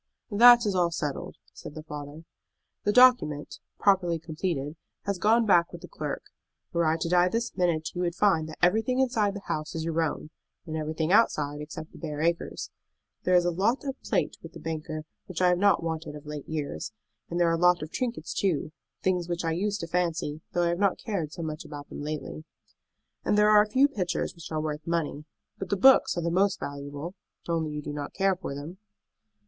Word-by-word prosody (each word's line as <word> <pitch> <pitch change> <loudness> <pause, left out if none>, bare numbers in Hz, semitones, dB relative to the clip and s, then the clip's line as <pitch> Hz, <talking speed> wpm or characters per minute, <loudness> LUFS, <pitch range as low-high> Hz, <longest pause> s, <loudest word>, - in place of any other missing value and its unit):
"That 240 +3 +8
is 205 - +1
all 175 -2 +2
settled," 150 -4 -4 0.2
said 145 - -10
the 155 - -7
father. 150 +1 -8 0.6
"The 205 - +3
document, 245 - +4 0.2
properly 185 -4 +3
completed, 160 -2 -3 0.3
has 200 -3 -2
gone 225 +4 +4
back 175 -4 +4
with - - -9
the - - -9
clerk. - - -5 0.5
Were 170 -1 +2
I 160 +1 +2
to - - 0
die 175 +1 +4
this 235 +4 -2
minute 170 -4 0
you 180 - -3
would 175 -1 -1
find 185 -6 +2
that 155 - -9
everything 220 +8 +3
inside 225 -6 +1
the 205 - -6
house 155 +1 -3
is 160 - -2
your 165 0 0
own, 155 -1 -3 0.3
and 160 -2 -5
everything 155 +1 -1
outside 150 -9 +3
except 155 +1 -8
the - - -13
bare 150 -3 -5
acres. 170 +2 -1 0.5
There 180 - +4
is 175 -1 +5
a 175 - +2
lot 205 +9 +1
of 270 -1 -2
plate - - -1
with - - -11
the - - -9
banker 155 -1 -4 0.2
which 185 -3 -5
I 180 -1 +5
have 180 0 +2
not 200 -3 +4
wanted 160 -2 -4
of 150 0 -10
late 150 -1 -7
years. 145 - -4 0.4
And 175 - -2
there 170 -1 +4
are - - +2
a - - -1
lot 180 -1 +4
of 155 - -7
trinkets 235 -10 -3
too, 170 -5 0 0.3
things 180 -2 0
which 175 0 -2
I 165 - +1
used 205 +5 -1
to 170 - -4
fancy, 165 -3 -1
though 175 - +2
I 170 - +2
have 170 +1 -1
not 200 -2 +2
cared 180 -9 -3
so 170 +1 -6
much 155 0 -4
about 145 -2 -9
them - - -7
lately. 155 +1 -5 0.8
And 210 - +2
there 210 0 +5
are 210 0 +8
a 210 - -1
few 265 +6 +5
pictures 190 -10 -2
which 170 -1 -11
are 155 - -1
worth 155 0 -4
money. 160 -3 -1 0.3
But 195 - -5
the 200 - +1
books 265 -2 +6
are 170 - -1
the 170 - 0
most 195 +2 +2
valuable; 145 +4 -6 0.3
only 165 -2 0
you 150 0 -5
do 145 - -5
not 145 -1 -5
care 195 -1 +2
for 175 -6 -6
them." 155 +7 -8
170 Hz, 215 wpm, -27 LUFS, 155-195 Hz, 0.8 s, That